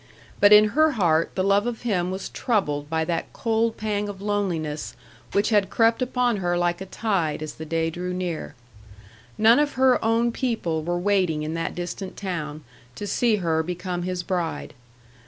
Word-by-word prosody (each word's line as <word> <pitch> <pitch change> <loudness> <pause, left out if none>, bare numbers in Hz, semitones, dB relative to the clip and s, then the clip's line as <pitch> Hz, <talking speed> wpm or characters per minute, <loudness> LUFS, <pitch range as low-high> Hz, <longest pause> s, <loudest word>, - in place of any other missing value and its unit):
But 205 - +6
in 210 0 +8
her 310 +5 +3
heart 165 -7 +2
the 185 - 0
love 200 +3 +3
of 240 -1 -4
him 185 -7 0
was 190 +1 -4
troubled 150 - -1
by 160 0 0
that 165 0 -3
cold 225 0 0
pang 210 -1 -2
of 200 -2 -7
loneliness 180 -7 -2 0.4
which 200 +3 +2
had 205 -2 +3
crept 230 +1 +2
upon 250 -2 +1
her 175 -2 0
like 175 0 0
a 190 - -6
tide 180 -8 -1
as 155 -1 -6
the 160 - -9
day 165 0 0
drew 180 +2 -4
near. 180 -3 -4 0.8
None 225 +4 +6
of 295 -1 +1
her 260 -1 +3
own 230 +1 +2
people 225 -11 -1
were 175 +2 -2
waiting 180 -5 +1
in 155 +1 -3
that 165 0 -3
distant 180 +2 -5
town 155 -6 -4 0.3
to 205 - -5
see 230 +2 +2
her 165 -5 0
become 180 +1 -4
his 180 0 -3
bride. 170 -4 -3
185 Hz, 180 wpm, -24 LUFS, 165-215 Hz, 0.8 s, in